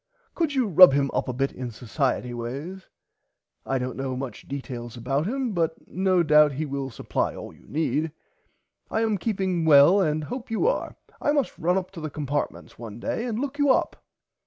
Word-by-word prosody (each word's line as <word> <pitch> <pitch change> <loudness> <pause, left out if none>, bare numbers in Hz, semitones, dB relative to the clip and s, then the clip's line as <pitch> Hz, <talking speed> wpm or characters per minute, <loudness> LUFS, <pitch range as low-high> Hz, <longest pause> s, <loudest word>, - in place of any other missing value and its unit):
Could 320 -4 -1
you 260 -2 +2
rub 180 -4 +8
him 140 0 +1
up - - -1
a - - -1
bit 135 +2 -1
in 125 -1 -6
Socierty 125 +2 -2
ways. 140 +11 -6 0.8
I 135 - +1
dont 125 0 -3
know 135 -1 -3
much 130 -1 -7
details 125 -4 -6
about 135 +7 -1
him 260 0 -1
but 165 -3 0
no 185 -1 +2
doubt 150 -2 +5
he 155 +4 -3
will 140 -1 -4
supply 115 - -2
all - - -8
you - - -21
need. 155 +1 -1 0.8
I 220 - 0
am 220 -3 +1
keeping 190 -5 -1
well 160 +5 +7
and 155 -3 0
hope 245 - -6
you 225 - 0
are. - - 0 0.3
I 290 - +2
must 285 -4 0
run 180 +3 +2
up 185 -1 -3
to 175 -4 -9
the 155 - -4
Compartments 145 -1 -4
one 115 -1 -8
day 225 - -2
and 230 -3 -2
look 280 +3 -4
you 285 -1 +3
up. 260 - +1
155 Hz, 195 wpm, -25 LUFS, 135-195 Hz, 0.8 s, rub